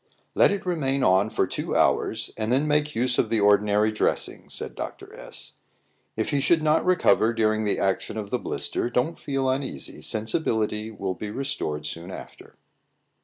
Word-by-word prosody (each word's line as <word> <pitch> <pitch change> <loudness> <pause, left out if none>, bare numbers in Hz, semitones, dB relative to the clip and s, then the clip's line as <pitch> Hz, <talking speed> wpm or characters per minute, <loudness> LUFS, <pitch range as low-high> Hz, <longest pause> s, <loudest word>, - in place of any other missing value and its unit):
"Let - - +5
it 200 -1 -2
remain 140 -7 0
on 95 +3 +4
for 110 - +1
two - - -3
hours, 110 0 +1
and 110 +1 -2
then 135 +4 +2
make 150 0 +1
use 125 +1 +1
of - - +2
the 115 - +2
ordinary 105 +1 +4
dressing," 110 - -1
said - - -5
Dr. - - -7
S. - - -8 0.6
"If - - -1
he 140 - +1
should 160 +2 +3
not 155 +1 +3
recover 170 -10 +3
during 110 -1 +1
the 105 - +1
action 95 +3 -1
of 105 -2 -5
the 125 - 0
blister, 120 - -2
don't 125 +7 -1
feel 135 -2 -1
uneasy; 130 - -3
sensibility 110 -2 0
will 100 -4 -3
be 105 +3 -6
restored 105 - -3
soon 85 +4 -5
after." - - -11
110 Hz, 170 wpm, -25 LUFS, 105-135 Hz, 0.6 s, Let